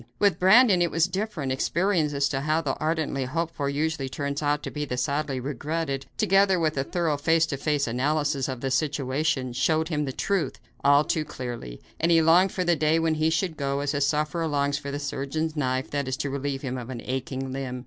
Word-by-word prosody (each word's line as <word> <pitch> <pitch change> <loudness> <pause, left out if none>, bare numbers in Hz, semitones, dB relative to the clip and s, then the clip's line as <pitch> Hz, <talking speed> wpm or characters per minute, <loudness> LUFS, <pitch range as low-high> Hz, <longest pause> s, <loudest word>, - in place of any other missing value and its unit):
With 200 -2 +2
Brandon 190 0 +6
it 175 - +3
was 165 0 +2
different; 185 -7 -3
experience 170 +3 +1
as 140 0 +2
to 135 -1 -2
how 155 +2 +1
the 140 -4 -1
ardently 155 -4 -1
hoped 165 +5 -2
for 140 -1 -2
usually 145 -1 -1
turns 140 +2 -3
out 145 0 0
to - - -5
be 150 - -3
the 125 -4 -3
sadly 140 +1 -1
regretted, 145 +2 -3
together 195 -1 +4
with 155 -2 +1
a 135 - 0
thorough 165 -1 -1
face 160 +3 +3
to 150 -4 -4
face 145 0 0
analysis 145 +3 0
of 130 -2 -5
the 135 - -2
situation, 135 -2 0
showed 160 +5 +1
him 150 -3 -1
the 135 - -3
truth, 195 +6 -1 0.2
all 145 +1 +6
too 155 0 0
clearly, 120 - -7 0.2
and 165 - +2
he 165 - +6
longed 170 +4 +5
for 185 - -1
the 175 -1 +3
day 155 +1 +2
when 165 -1 +1
he 155 +1 +1
should 165 +1 0
go, 140 0 -1
as 145 0 -1
a 140 - -1
sufferer 155 +3 0
longs 140 -1 0
for 140 -1 -6
the 140 - -3
surgeon's 145 +3 -3
knife 130 -3 -1
that 140 -2 -2
is 130 0 -2
to 145 -2 -3
relieve 140 0 -3
him 130 -1 -3
of 120 0 -8
an 120 -3 -6
aching 130 0 -3
limb. 130 -2 -4
145 Hz, 220 wpm, -26 LUFS, 135-160 Hz, 0.2 s, Brandon